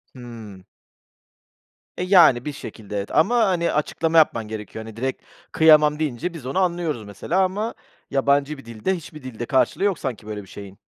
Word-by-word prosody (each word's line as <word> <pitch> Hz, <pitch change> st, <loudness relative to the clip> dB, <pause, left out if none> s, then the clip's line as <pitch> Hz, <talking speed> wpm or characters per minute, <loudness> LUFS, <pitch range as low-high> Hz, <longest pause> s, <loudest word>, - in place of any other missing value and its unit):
Hımm. 115 Hz, -6 st, -10 dB, 1.3 s
E, -, -, -2 dB
yani, 175 Hz, -10 st, +5 dB
bir 150 Hz, -, -3 dB
şekilde, 105 Hz, -6 st, -8 dB
evet 100 Hz, -, -4 dB
ama, 195 Hz, +11 st, +4 dB
hani, 170 Hz, -2 st, +1 dB
açıklama 165 Hz, +2 st, 0 dB
yapman 115 Hz, -8 st, +3 dB
gerekiyor. 110 Hz, +1 st, -7 dB
Hani, 110 Hz, -, -10 dB
direkt 130 Hz, +2 st, -3 dB, 0.3 s
kıyamam 150 Hz, -1 st, +5 dB
deyince 155 Hz, +3 st, -2 dB
biz 160 Hz, -7 st, -9 dB
onu 135 Hz, +8 st, -1 dB
anlıyoruz, 170 Hz, -, -1 dB
mesela, 105 Hz, -, -2 dB
ama 205 Hz, +5 st, -2 dB, 0.4 s
yabancı 140 Hz, +2 st, +1 dB
bir 135 Hz, -, -13 dB
dilde, 115 Hz, -, -2 dB
hiçbir 155 Hz, -4 st, -10 dB
dilde 120 Hz, -2 st, -6 dB
karşılığı 130 Hz, +9 st, +1 dB
yok 200 Hz, -5 st, +1 dB
sanki 120 Hz, -5 st, -5 dB
böyle 105 Hz, -1 st, -5 dB
bir -, -, -17 dB
şeyin. 100 Hz, 0 st, -11 dB
140 Hz, 170 wpm, -22 LUFS, 110-165 Hz, 1.3 s, yani